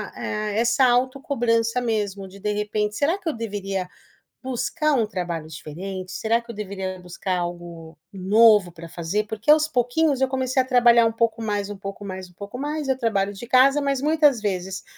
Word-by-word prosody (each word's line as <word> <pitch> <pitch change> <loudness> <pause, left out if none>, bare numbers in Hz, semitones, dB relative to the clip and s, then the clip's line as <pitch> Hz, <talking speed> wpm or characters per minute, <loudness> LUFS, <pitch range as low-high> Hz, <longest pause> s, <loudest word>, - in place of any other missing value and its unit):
ah, 210 0 -3
essa 235 +4 +3
autocobrança 245 -2 +1
mesmo, 205 -4 -2
de, 195 +1 -14
de 210 +1 -1
repente, 210 0 -2
será 330 +7 +1
que 335 - -3
eu - - -2
deveria 195 -4 -4 0.6
buscar 265 +4 -1
um 230 -4 +2
trabalho 175 -6 -4
diferente, 185 +5 -7
será 230 +1 +1
que 235 0 -13
eu - - -12
deveria 190 -2 -5
buscar 180 +1 -3
algo 170 -2 -7
novo 205 0 +5
para 170 0 -11
fazer? 175 +6 -2
Porque 220 +6 -1
aos 310 0 +6
pouquinhos 270 +1 +1
eu 265 - +2
comecei 260 0 +1
a - - -8
trabalhar 240 -2 +5
um 225 - +1
pouco 230 0 0
mais, 205 -2 -2
um 205 - -6
pouco 195 +1 -8
mais, 185 -1 -7
um 180 - -24
pouco 205 +5 -8
mais, 295 +2 -3
eu 265 - +2
trabalho 205 -5 0
de 220 +4 -9
casa, 270 +3 +5
mas 275 -2 0
muitas 295 -5 +3
vezes, 190 -2 -3
215 Hz, 190 wpm, -23 LUFS, 190-255 Hz, 0.6 s, aos